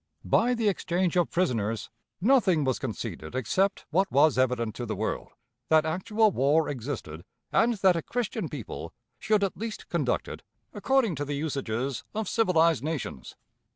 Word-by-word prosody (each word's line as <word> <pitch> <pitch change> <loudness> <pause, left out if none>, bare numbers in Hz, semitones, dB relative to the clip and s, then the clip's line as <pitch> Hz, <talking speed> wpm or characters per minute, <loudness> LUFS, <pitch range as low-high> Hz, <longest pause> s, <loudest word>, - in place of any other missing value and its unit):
By 245 +2 +3
the 230 -2 0
exchange 180 -2 0
of 175 -1 +2
prisoners, 115 - -1 0.3
nothing 195 - +4
was 130 -2 0
conceded 95 -8 -5
except 190 - 0
what 190 +4 +2
was 145 +1 +5
evident 125 -3 +1
to 120 - -4
the 110 - -2
world 110 +3 -3 0.4
that 155 -1 +5
actual 210 +7 +2
war 150 +2 +2
existed, 120 - -5 0.3
and 235 +1 +3
that 190 -3 +4
a 165 - -1
Christian 240 +5 -3
people - - -7 0.3
should 215 -2 +2
at 195 - -1
least 220 +2 -6
conduct - - 0
it - - -7 0.3
according 265 -7 +2
to 145 - -2
the 145 0 -3
usages 135 -4 -2
of 220 -2 -2
civilized 170 -9 +3
nations. 150 - -4
160 Hz, 155 wpm, -27 LUFS, 130-200 Hz, 0.4 s, was